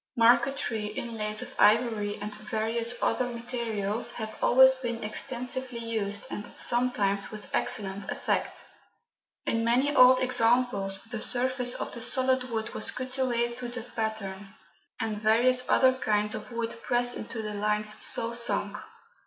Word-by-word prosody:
Marquetry, 235 -2 +2
inlays 215 -1 -2
of - - -10
ivory, 215 -2 +3
and 210 +1 -5
various 225 +3 -1
other 250 - +1
materials 235 -3 -1
have 220 -2 -6
always 260 +1 +6
been 240 -3 -5
extensively 250 +3 -3
used, 220 -3 -1
and 205 - -4
sometimes 210 -5 +2
with 215 -1 -11
excellent 195 -1 -1
effect. - - -2 0.8
In 230 0 0
many 255 +5 +2
old 255 0 +7
examples 235 -5 +1
the 225 -1 -7
surface 250 0 +1
of - - -5
the 235 - -6
solid 255 +1 +1
wood 220 -2 -4
was - - 0
cut 255 0 -4
away 240 -2 0
to 245 0 -6
the 245 -1 -5
pattern, 205 -3 -4 0.4
and 215 -2 -3
various 250 +4 +3
other 260 -1 +5
kinds 210 -4 0
of - - -7
wood 230 -1 -4
pressed 245 0 +1
into 220 0 -6
the 210 0 -5
lines 210 +1 -1
so 230 +1 0
sunk. 235 +1 -1
230 Hz, 145 wpm, -28 LUFS, 215-245 Hz, 0.8 s, old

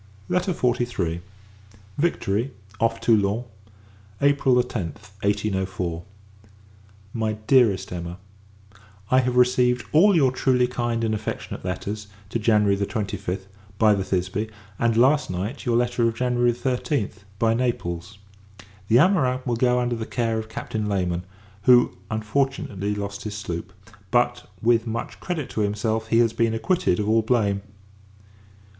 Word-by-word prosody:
LETTER 180 +1 +1
XLIII. 120 - -1 0.8
Victory, 130 - 0 0.3
off 115 0 +1
Toulon, 110 -1 +2 0.8
April 140 -2 +3
10th, 105 -4 -2
1804. 95 -4 -1 1.1
MY 110 -1 -1
DEAREST 110 -8 +3
EMMA, 85 0 -5 0.9
I 130 - +6
have 125 -1 0
received 125 0 +3
all 190 +6 +6
your 135 -6 +4
truly 130 -1 +2
kind 120 -2 -2
and 110 -1 +1
affectionate 105 0 -5
letters, 100 +3 -4 0.2
to 115 - -2
January 105 -2 +3
25th, 100 -2 -3 0.3
by 110 0 +5
the 100 -2 0
Thisbe; 95 +4 -1 0.3
and, 115 -1 +2
last 140 +5 +4
night, 100 +10 -4
your 120 -1 +3
letter 120 -1 +2
of 115 - -1
January 120 0 +2
13th, 125 -1 -1 0.2
by 115 +1 +2
Naples. 100 -6 -2 0.7
The 110 - +3
amorins 130 -6 +3
will 120 -2 0
go 125 +1 +2
under 120 -1 0
the 110 -1 -5
care 115 -2 -1
of 110 0 -7
Captain 110 -1 -4
Layman; 90 -3 -1 0.4
who, 125 -1 +6
unfortunately, 110 -3 -1
lost 100 0 -5
his 105 -1 -5
sloop: 90 -2 -5 0.4
but, 120 +1 +1
with 115 0 +3
much 115 +1 -4
credit 160 -7 -3
to 110 - -1
himself, 110 +2 -1
he 115 - +2
has 115 -1 +4
been 115 -1 +1
acquitted 115 - +1
of 105 - -1
all 110 +1 +4
blame. 105 -4 +1
115 Hz, 135 wpm, -24 LUFS, 100-125 Hz, 1.1 s, I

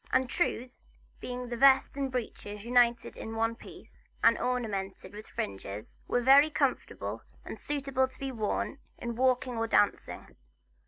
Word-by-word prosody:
And 260 0 +3
trews 250 -3 -2 0.4
being 250 0 -5
the 240 - -3
vest 270 +1 +5
and 275 -2 -2
breeches 210 -4 -5
united 240 -1 +3
in 225 - -6
one 225 +1 +1
piece, - - -14 0.2
and 230 0 +7
ornamented 210 -8 -3
with 210 +1 -9
fringes, 100 +2 -6
were 245 - +1
very 280 +4 +7
comfortable, - - -1 0.2
and - - -7
suitable 275 -2 0
to 260 - -17
be 270 -1 -3
worn 230 +4 -2 0.2
in 235 -1 -4
walking 255 0 +1
or 225 - 0
dancing. 205 -2 0
245 Hz, 150 wpm, -30 LUFS, 225-260 Hz, 0.4 s, and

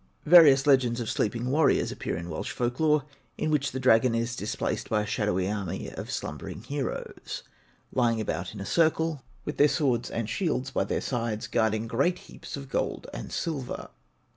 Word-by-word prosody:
Various 150 -5 +8
legends 130 -4 +4
of 115 - -2
Sleeping 120 +4 -1
Warriors 150 0 +3
appear - - -3
in 85 +1 -6
Welsh 80 - -4
folk 120 0 -2
lore, 150 -2 +3 0.3
in 155 - -1
which 140 -2 +1
the 130 - -4
dragon 120 -1 +4
is 115 +1 -1
displaced 105 -2 -3
by 105 -1 +2
a - - -4
shadowy 100 -3 0
army 100 -4 -3
of - - -7
slumbering - - -5
heroes, 140 -3 -4 0.5
lying 120 -3 +2
about 110 0 -3
in - - -7
a 100 - -5
circle, 160 -1 +2 0.2
with 150 - -4
their 145 - +6
swords 130 -6 +1
and 115 -2 -3
shields 135 - -1
by - - 0
their - - -1
sides, 115 -4 -2
guarding 110 -1 +1
great 140 +10 +1
heaps - - -9
of 140 -1 -8
gold - - -2
and - - -6
silver. 140 -7 -3
125 Hz, 180 wpm, -28 LUFS, 110-145 Hz, 0.5 s, Various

